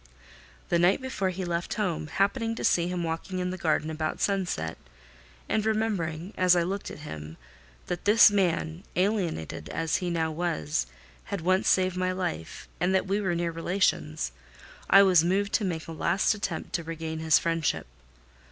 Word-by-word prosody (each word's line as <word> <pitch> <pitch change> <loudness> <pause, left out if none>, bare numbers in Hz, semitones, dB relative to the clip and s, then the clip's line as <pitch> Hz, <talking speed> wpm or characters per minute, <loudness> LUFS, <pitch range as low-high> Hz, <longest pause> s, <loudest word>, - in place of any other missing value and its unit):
The 170 - +3
night 175 +3 +4
before 260 -8 -2
he 185 0 -4
left 170 0 -2
home, 180 -8 -1
happening 225 +6 0
to - - -5
see 170 0 +3
him 180 -1 -2
walking 165 +3 -3
in 180 0 -1
the - - -3
garden 155 -1 0
about 155 0 -3
sunset, 175 - -1 0.7
and 215 - +1
remembering, 205 -5 -1
as 180 -1 +4
I 175 - +3
looked 195 +3 -3
at - - -9
him, 80 - -8 0.5
that 175 - -4
this 215 +1 +7
man, 175 -3 0
alienated 180 - -1
as 165 -1 0
he 180 - -3
now 165 -2 0
was, 80 - -1 0.4
had 200 -4 -4
once 185 +3 +2
saved 185 -1 +2
my 185 0 +1
life, 180 - -4
and 185 +2 +2
that 190 - +2
we 200 +2 0
were 180 -4 0
near 170 0 -1
relations, 120 - 0 0.6
I 195 +1 +8
was 180 -4 +5
moved 195 +4 0
to - - +2
make 165 -4 -3
a - - -6
last 170 +5 +1
attempt 195 -6 -4
to 170 - -1
regain 160 -1 -5
his 160 -1 +4
friendship. 165 - 0
175 Hz, 175 wpm, -27 LUFS, 160-195 Hz, 0.7 s, I